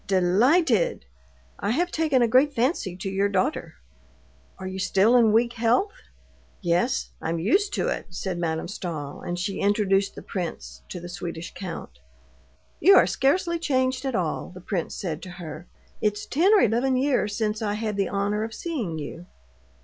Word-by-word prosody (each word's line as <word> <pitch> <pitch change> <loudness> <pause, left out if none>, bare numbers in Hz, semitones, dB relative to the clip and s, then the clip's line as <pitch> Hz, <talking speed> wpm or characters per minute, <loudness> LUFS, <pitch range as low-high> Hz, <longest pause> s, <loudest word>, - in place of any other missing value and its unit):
"Delighted! 200 - +3 0.5
I 200 - -2
have 345 +10 +1
taken 300 -6 +2
a - - +4
great 265 +5 +4
fancy 235 - 0
to 190 - -5
your 195 +1 +1
daughter." 190 -2 -1 0.8
"You 190 0 -5
are - - -5
still 195 +5 +3
in 230 -3 +5
weak 235 +2 +3
health?" 240 - +2 0.7
"Yes; 180 +8 0
I'm 165 +1 -1
used 385 - +2
to - - 0
it," - - -3
said 180 0 -4
Madame 160 -1 -2
Stahl, 165 -7 -5
and 175 - -4
she 190 +2 -3
introduced 200 -1 +2
the - - -9
prince 175 -4 -5
to 180 - -6
the 175 - -8
Swedish 175 -2 -6
count. 165 - -7 0.8
"You 390 +6 +7
are - - +7
scarcely 340 +4 +1
changed 260 -4 0
at 265 -3 -2
all," 175 -4 -2
the 185 - -11
prince 180 -1 -3
said 165 -4 -4
to 185 - -8
her. 170 -1 -8 0.3
"It's 210 -1 0
ten 345 +9 +3
or 405 - +6
eleven 245 +4 +2
years 255 -6 +1
since 215 -1 -1
I 205 -1 -1
had 215 -1 -2
the 195 -2 0
honor 205 +2 0
of 220 0 -5
seeing 240 - -3
you." 160 +4 -7
205 Hz, 170 wpm, -25 LUFS, 180-255 Hz, 0.8 s, You